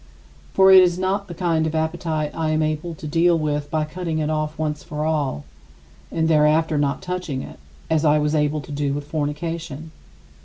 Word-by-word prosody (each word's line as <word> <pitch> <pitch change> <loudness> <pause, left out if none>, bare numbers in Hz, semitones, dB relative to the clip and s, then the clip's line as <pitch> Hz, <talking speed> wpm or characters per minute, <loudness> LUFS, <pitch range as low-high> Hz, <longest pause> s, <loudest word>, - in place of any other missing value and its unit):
For 190 0 +7
it 190 -1 +10
is 175 -1 +3
not 195 +2 -1
the 175 - -8
kind 165 -2 +1
of 160 - -3
appetite 160 -1 -1
I 160 -1 -1
am 155 0 +1
able 155 +2 -2
to 155 - -10
deal 165 +3 +3
with 150 -2 -2
by 155 -1 0
cutting 165 0 -4
it 155 0 -1
off 155 0 -2
once 150 -1 -2
for 150 0 -4
all, 145 - -1 0.7
and 160 -1 0
thereafter 155 0 +3
not 140 -1 -1
touching 180 -7 -3
it, - - -11 0.3
as 160 -1 +1
I 150 -1 +4
was 150 0 0
able 150 0 +1
to 140 - -11
do 145 -1 -1
with 145 0 -5
fornication. 155 +1 -4
155 Hz, 195 wpm, -22 LUFS, 150-165 Hz, 0.7 s, it